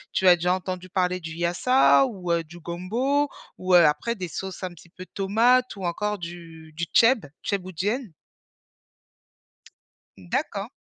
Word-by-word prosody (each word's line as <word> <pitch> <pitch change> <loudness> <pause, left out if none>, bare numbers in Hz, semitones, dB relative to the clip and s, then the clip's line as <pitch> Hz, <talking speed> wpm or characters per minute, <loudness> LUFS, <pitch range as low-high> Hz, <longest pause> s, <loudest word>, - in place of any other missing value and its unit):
tu 190 - +2
as 180 - +9
déjà 180 +1 +1
entendu 185 0 -5
parler 180 -1 0
du 165 -2 -8
yassa 175 +12 +3
ou, 190 -9 -4
heu, 170 -1 +1
du 170 +2 -13
gombo 230 - -1 0.3
ou, 185 0 -1
heu, 175 -1 +8
après 150 +10 +2
des 185 -4 -5
sauces 190 +3 -6
un 185 - -2
petit 175 0 -17
peu 185 +2 -11
tomates 230 +6 +2
ou 195 -2 -6
encore 210 +4 -2
du 165 -2 -10
du 170 - -1
thieb 230 - +4 0.2
thiéboudiène? 200 - -3 2.1
Mmh 90 -2 -15
d'accord. - - -2
185 Hz, 155 wpm, -25 LUFS, 170-210 Hz, 2.1 s, as